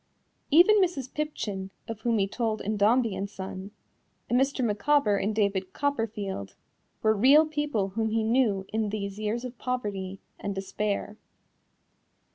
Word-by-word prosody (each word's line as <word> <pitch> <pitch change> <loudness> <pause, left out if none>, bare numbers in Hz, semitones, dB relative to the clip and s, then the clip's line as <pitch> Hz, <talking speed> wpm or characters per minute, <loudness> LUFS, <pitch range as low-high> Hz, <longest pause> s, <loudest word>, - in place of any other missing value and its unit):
Even 365 +7 +6
Mrs. 290 -9 -1
Pipchin, 215 -11 -3 0.2
of 225 -2 -5
whom 230 0 +1
he 195 -1 +2
told 220 0 -2
in 215 +2 -2
Dombey 220 +2 +3
and 200 +1 -3
Son, 190 0 -7 0.6
and 250 +2 +3
Mr. 270 -2 +1
Micawber 215 +1 +2
in 205 - 0
David 200 -3 0
Copperfield, 210 - -2 0.5
were 220 0 +5
real 275 +9 +6
people 295 -10 -1
whom 220 +3 -1
he 220 0 +1
knew 220 -4 +2
in 220 -1 0
these 200 -1 -4
years 220 +3 -2
of 245 -1 -8
poverty 200 -7 -3 0.2
and 200 -1 -4
despair. 205 +2 -3
215 Hz, 145 wpm, -27 LUFS, 200-255 Hz, 0.6 s, Even